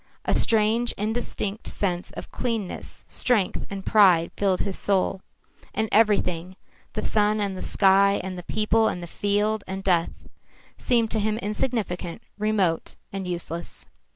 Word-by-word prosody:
A - - +2
strange 225 +1 +3
indistinct 215 -1 -3
sense 180 -3 -2
of - - -8
cleanness, 225 -6 -4
strength 220 -7 0
and 195 -1 -6
pride 185 -6 +5
filled 195 -2 +1
his 195 - -3
soul, 195 -1 0 0.5
and 220 +2 +1
everything 185 -5 +2 0.4
the - - -2
sun 210 0 +2
and 200 -2 -1
the 185 - -6
sky 200 0 +4
and 185 0 -4
the 180 - -6
people 215 +4 +2
and 175 - -3
the - - -4
field 205 +4 0
and 190 +1 -5
death 175 -3 +2 0.7
seemed 230 -3 +1
to 220 - +1
him 215 +1 0
insignificant, 205 -5 -3 0.2
remote 200 -6 0 0.2
and 195 -2 -4
useless. 170 - -5
200 Hz, 145 wpm, -25 LUFS, 185-215 Hz, 0.7 s, pride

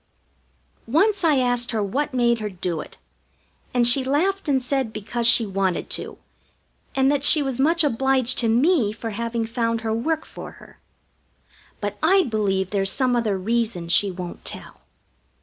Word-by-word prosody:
Once 385 - +2
I 310 -4 +3
asked 245 -2 0
her 220 -3 -1
what 285 +10 -2
made 240 -2 +1
her 210 -1 -4
do 175 -3 -4
it, - - -13 0.7
and 245 -1 +2
she 260 +2 +6
laughed 330 +7 -1
and 275 - +3
said 260 -3 -1
because 225 +2 -2
she 235 -1 +5
wanted 195 -3 -2
to, - - -4 0.8
and 270 +1 +3
that 285 -1 -1
she 295 +1 +6
was 265 -2 -4
much 330 +4 +3
obliged 265 -1 +1
to 230 - 0
me 245 - +2
for 225 +1 -6
having 230 +1 -3
found 230 0 -2
her 220 -1 -2
work 310 +8 -2
for - - -10
her. - - -18 1.0
But 205 -1 -5
I 375 +4 +4
believe 200 - -1
there's 195 -2 +1
some 255 -2 +1
other 220 -5 0
reason 215 -4 -2
she 200 +4 +4
won't 180 -1 -8
tell. - - -7
235 Hz, 165 wpm, -22 LUFS, 215-275 Hz, 1.0 s, she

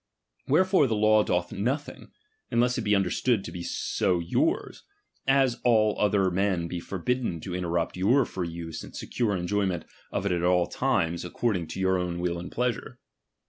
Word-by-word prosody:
Wherefore 185 0 +4
the 115 - 0
law 110 0 +5
doth 90 -2 -1
nothing, 130 +9 -3 0.4
unless 125 +1 +2
it - - -1
be 105 -1 +2
understood 100 +3 +1
to - - -7
be 90 - -6
so 90 +1 0
yottrs, 315 - -1 0.5
as 135 -3 +3
all 110 -3 +4
other 100 -3 +2
men 95 -2 0
be 85 +1 -4
forbidden 100 +1 -2
to 90 - -6
interrupt 85 -2 -1
your 115 +9 +3
free 90 -3 -4
use 85 -1 -6
and - - -11
secure 110 -6 -1
enjoyment 95 0 -1 0.3
of 95 - -2
it 100 - +1
at 90 -1 0
all 90 0 +3
times, 85 +1 0
according 90 -1 -1
to 95 - -6
your 95 -1 +2
own 90 -1 -2
will 85 -1 -1
and 90 - -7
pleasure. 125 -1 -2
95 Hz, 175 wpm, -27 LUFS, 90-120 Hz, 0.5 s, law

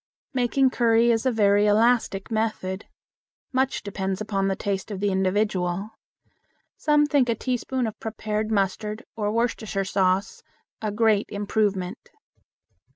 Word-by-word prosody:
Making 260 +1 +2
curry 235 -1 +3
is 230 +3 +1
a - - +3
very 205 -2 +3
elastic 220 -2 +2
method. 215 -4 -2 0.7
Much 265 0 0
depends 190 -1 -3
upon 200 -2 -1
the 195 - 0
taste 195 +1 -3
of 200 -3 -5
the 205 0 +1
individual. 190 0 0 0.8
Some 295 -1 +3
think 285 -4 +2
a 230 - +2
teaspoonful 255 -1 -2
of 215 - -14
prepared 215 -1 -3
mustard 210 +2 -1
or 210 -2 -1
Worcestershire 220 -4 -1
sauce 190 0 0 0.4
a 215 -1 -1
great 215 -1 +2
improvement. 205 -1 -2
215 Hz, 130 wpm, -25 LUFS, 195-230 Hz, 0.8 s, curry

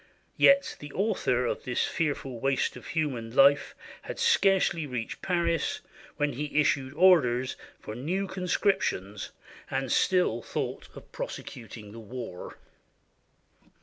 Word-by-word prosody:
Yet 275 0 +5
the 145 0 -9
author 185 - +1
of - - -2
this 125 -1 0
fearful 140 -6 -2
waste 135 +1 0
of - - -10
human 130 -8 -2
life 140 +1 +5 0.3
had - - -7
scarcely 195 - +3
reached 125 -4 -5
Paris 170 -4 0 0.4
when 145 -1 0
he 150 +3 -1
issued 140 -2 +1
orders 130 -8 +4 0.2
for 105 - -7
new 170 - -2
conscriptions, 180 - -1 0.4
and 135 -1 -2
still 180 - +2
thought - - -4
of - - -13
prosecuting 110 -3 -7
the 115 - -9
war! 115 -5 -8
140 Hz, 120 wpm, -28 LUFS, 120-180 Hz, 0.4 s, Yet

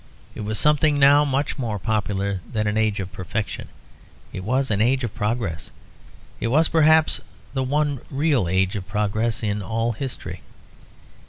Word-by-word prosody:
It - - -7
was 105 +1 -2
something 150 0 +3
now 145 +1 +6
much 140 0 -1
more 110 -5 -2
popular 100 -2 -1
than 105 -3 -1
an 105 0 0
age 110 -2 +1
of 95 -1 -5
perfection; 95 +3 -4 0.7
it 95 - -5
was 130 +4 0
an 105 -1 +1
age 130 +3 +2
of 115 - -3
progress. 105 -6 -2 0.7
It - - -1
was 155 +7 +3
perhaps 160 0 +4 0.3
the 135 - 0
one 140 0 0
real 140 - +1
age 95 +3 +1
of 95 -2 -5
progress 105 +2 -1
in 105 -1 -1
all 115 +3 -1
history. 130 +3 -6
115 Hz, 160 wpm, -23 LUFS, 105-140 Hz, 0.7 s, now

